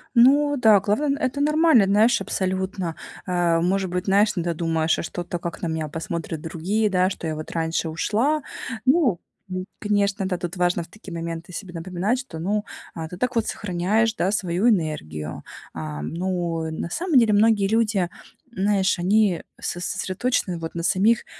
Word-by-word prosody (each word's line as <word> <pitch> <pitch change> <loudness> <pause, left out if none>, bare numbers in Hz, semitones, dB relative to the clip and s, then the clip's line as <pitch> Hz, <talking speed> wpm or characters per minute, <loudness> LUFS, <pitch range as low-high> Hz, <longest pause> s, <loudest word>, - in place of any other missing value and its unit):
Ну 285 +4 +5
да, 220 -5 +6
главное- 275 +9 0
это 280 0 -1
нормально, 300 -6 +5
знаешь, 210 +3 +4
абсолютно. 190 -3 -2 0.3
Э, 175 -2 +2
может 190 +1 +1
быть, 180 +1 -2
знаешь, 205 +2 +4
иногда 175 -1 -1
думаешь: 165 -1 +1
"А - - -3
что-то, 175 +1 -4
как 170 0 -6
на 170 - -1
меня 160 -1 -2
посмотрят 165 0 -4
другие, 185 +7 -1
да, 185 -1 +2
что 175 - -5
я 155 - -2
вот 155 0 -7
раньше 165 0 -1
ушла?" 230 - +1 0.4
Ну, 260 - +3 0.3
м, 185 0 -4
конечно, 200 -1 +1
да, 180 -2 -1
тут 175 +1 -5
важно 175 -1 +1
в - - -14
такие 200 0 -11
моменты 170 +1 -5
себе 185 -1 -7
напоминать, 185 +8 -1
что, 220 -12 -8
ну, 205 +5 -1 0.3
а, 160 -1 -5
ты 175 +2 -9
так 250 +3 -1
вот 230 -2 +1
сохраняешь, 205 +4 0
да, 190 -1 +1
свою 185 +2 +1
энергию. 150 - -2 0.3
А, 75 -2 -5
ну, 170 - -2
на 160 +1 -4
самом 335 - +1
деле, 225 -3 +5
многие 205 -1 +4
люди, 215 -5 +1 0.5
знаешь, 195 -1 +2
они 190 0 +2 0.2
со 175 - -3
сосредоточены 190 0 -1
вот 165 0 -6
на 170 - -3
самих, 215 +7 +3
185 Hz, 170 wpm, -23 LUFS, 170-215 Hz, 0.5 s, да